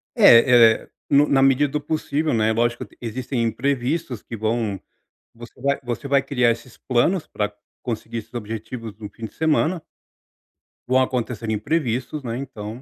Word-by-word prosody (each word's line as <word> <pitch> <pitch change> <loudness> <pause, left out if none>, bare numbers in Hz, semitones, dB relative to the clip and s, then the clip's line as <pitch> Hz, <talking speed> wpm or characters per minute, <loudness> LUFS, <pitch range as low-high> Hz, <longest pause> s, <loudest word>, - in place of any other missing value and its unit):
É 115 -1 +7
é - - -20 0.2
no 145 +1 +5
na 135 -1 +3
medida 135 +2 +4
do 150 - -1
possível, 155 0 -1
né, 110 -1 +2
é - - +2
lógico 120 +1 0
t - - -22
existem 125 +2 -3
imprevistos 125 +3 -1
que 115 - -8
vão 110 -2 -1 0.6
você 120 +2 -13
vai 140 +2 0
você 125 +3 -4
vai 140 -1 +3
criar 130 -4 +2
esses 115 +1 -5
planos 145 +8 +1
para 105 0 -3 0.3
conseguir 115 0 -4
esses 115 - -10
objetivos 115 0 -6
no 105 -2 -7
fim 115 - -11
de - - -16
semana. 160 +2 +1 1.1
Vão 130 +1 +4
acontecer 125 -3 -2
imprevistos, 125 +4 -1
né, 115 -1 -3
então 120 -3 -7
120 Hz, 165 wpm, -22 LUFS, 115-140 Hz, 1.1 s, É